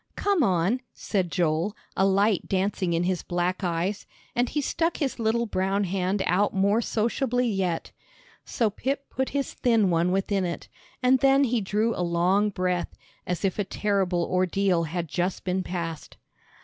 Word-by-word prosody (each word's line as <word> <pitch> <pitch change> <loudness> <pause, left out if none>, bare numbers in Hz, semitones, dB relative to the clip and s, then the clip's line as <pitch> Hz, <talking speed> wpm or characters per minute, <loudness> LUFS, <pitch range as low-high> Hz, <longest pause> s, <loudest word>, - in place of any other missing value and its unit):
"Come 400 -4 +1
on," 195 - +2
said 185 -5 -1
Joel, 175 +4 0 0.2
a 190 - +3
light 200 0 +2
dancing 190 -2 0
in 165 +1 +1
his 180 -1 0
black 180 +2 -2
eyes, 180 +3 -1 0.3
and 245 0 +1
he 300 - -1
stuck 330 +4 0
his 270 -4 -2
little 230 +1 +1
brown 195 -1 0
hand 190 +1 -1
out 195 +4 +2
more 200 +4 +3
sociably 245 +3 0
yet. 190 -6 -1 0.5
So 225 -3 0
Pip 275 +6 -3
put 265 +1 -1
his 280 -1 -2
thin 225 -6 +2
one 170 +1 +2
within 195 +1 0
it, 170 -2 -4 0.4
and 255 +1 +5
then 275 +2 +5
he 245 -3 +1
drew 215 +4 0
a - - -3
long 180 +4 +2
breath, 180 -2 -2 0.3
as 180 +2 -1
if 190 +1 -1
a - - +2
terrible 190 -3 0
ordeal 185 -1 +1
had 170 +1 -3
just 175 +4 -2
been 185 0 0
passed. 170 -3 -5
195 Hz, 165 wpm, -26 LUFS, 180-225 Hz, 0.5 s, and